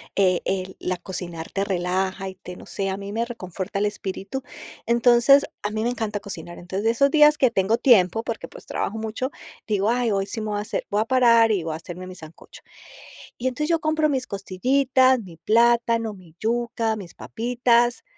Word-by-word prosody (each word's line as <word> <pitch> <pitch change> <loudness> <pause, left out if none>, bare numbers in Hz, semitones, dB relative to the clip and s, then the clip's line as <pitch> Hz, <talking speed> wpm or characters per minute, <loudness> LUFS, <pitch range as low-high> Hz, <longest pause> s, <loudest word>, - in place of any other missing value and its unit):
eh, 185 -3 +3
el, 190 -1 -3
la 180 0 -2
cocinar 175 -2 -6
te 195 - -1
relaja 190 +1 -1
y 190 - -10
te, 180 -1 -10
no - - -12
sé, 195 -1 -2
a 190 - -2
mí 200 0 -7
me 230 +2 -1
reconforta 195 -3 -5
el 210 - +1
espíritu. 205 +5 -5 0.4
Entonces, 240 +4 +5 0.2
a 205 - -2
mí 215 +1 -2
me 240 - +1
encanta 220 -4 -3
cocinar, 175 -3 -8
entonces, 190 +4 -4
de 225 - +4
esos 280 +4 +3
días 300 -1 +6
que 255 -3 +3
tengo 195 +4 +1
tiempo, 225 -3 +4
porque, 230 -1 -5
pues, - - -13
trabajo 220 - -3
mucho, 225 +5 -3 0.4
digo: 205 0 +1
"Ay, 240 -2 +1
hoy 195 -1 0
sí 220 - -4
me 215 - -4
voy 205 - -1
a - - -2
hacer, 210 - -4
voy 205 +1 +1
a - - 0
parar 230 -3 +5
y 190 -6 0
voy 160 -1 -3
a - - -4
hacerme 180 +1 -9
mi 185 - -9
sancocho". 160 -1 -13 0.8
Y 255 - -2
entonces 300 +5 -2
yo 330 -1 +2
compro 310 0 +1
mis 260 -2 -1
costillitas, 255 +6 +2
mi 175 -5 -12
plátano, 230 +2 +2
mi 175 -4 -16
yuca, 230 -1 -1
mis 180 -5 -10
papitas, 240 0 +1
215 Hz, 205 wpm, -23 LUFS, 190-240 Hz, 0.8 s, días